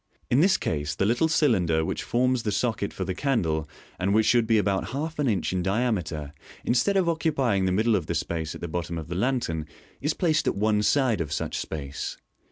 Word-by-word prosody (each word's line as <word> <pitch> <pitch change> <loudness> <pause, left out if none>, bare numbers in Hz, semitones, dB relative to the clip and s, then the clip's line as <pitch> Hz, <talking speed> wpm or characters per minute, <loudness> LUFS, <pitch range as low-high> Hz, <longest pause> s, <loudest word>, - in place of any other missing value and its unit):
In 125 - +4
this 190 +3 +5
case 75 -1 -2
the 95 - +1
little 120 +9 +2
cylinder 95 - +2
which - - -2
forms 125 +1 +1
the 105 - -2
socket 100 0 -1
for 95 - -4
the 95 - -2
candle, 85 - 0 0.3
and 100 +2 +1
which 110 0 +4
should 120 -2 +3
be 115 -1 +4
about 100 -2 0
half 155 +3 -3
an 145 - +1
inch 100 -3 0
in 90 - 0
diameter, 90 - -1 0.3
instead 125 +12 +2
of 185 -3 +2
occupying 140 - +1
the 95 - +1
middle 110 +4 +2
of 85 -6 -2
the 85 - -2
space 80 -1 -3
at - - -9
the 85 - -3
bottom 85 0 -3
of 80 -1 -7
the 85 - -3
lantern, 95 - -1 0.3
is 150 +3 0
placed 155 -3 +1
at - - +1
one 105 +1 +2
side 120 -4 +2
of 75 -3 -4
such - - -2
space. 70 -3 -5
105 Hz, 215 wpm, -26 LUFS, 85-130 Hz, 0.3 s, this